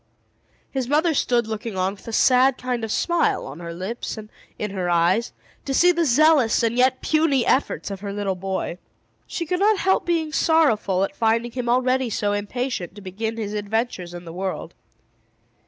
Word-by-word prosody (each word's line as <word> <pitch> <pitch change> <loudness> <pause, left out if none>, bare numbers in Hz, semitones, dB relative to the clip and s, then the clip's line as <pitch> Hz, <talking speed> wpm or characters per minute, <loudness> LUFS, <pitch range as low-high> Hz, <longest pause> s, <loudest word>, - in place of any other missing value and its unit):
His 260 -3 -2
mother 310 +4 +2
stood 240 -4 +1
looking 220 -1 -5
on, 185 +1 0
with 205 - -16
a - - -4
sad 255 +3 +4
kind 250 -2 -3
of - - -1
a - - -3
smile 345 +6 +1
on 135 +4 -9
her 170 -1 -6
lips 190 +8 -5
and 215 0 -9 0.3
in 210 -2 -3
her 185 -2 -2
eyes, 175 +7 +2 0.3
to 270 - -1
see 355 +5 +6
the 340 -1 +1
zealous 285 -4 +4
and 230 0 +1
yet 255 +1 +2
puny 305 -6 +2
efforts 260 -5 0
of 195 - -5
her 200 0 -5
little 200 -1 -2
boy. 190 -1 -4 0.5
She 335 - -4
could 360 +3 -1
not 420 +1 +4
help 380 0 +2
being 325 -3 0
sorrowful 225 - +2
at 195 - -3
finding 230 +1 +1
him 245 -1 -3
already 255 +1 +2
so 205 -1 -1
impatient 205 -2 -3
to 205 - -10
begin 220 +4 -4
his 210 -2 -4
adventures 210 -4 -2
in 175 0 -9
the 165 - -8
world. 190 +1 -4
230 Hz, 190 wpm, -23 LUFS, 195-265 Hz, 0.5 s, see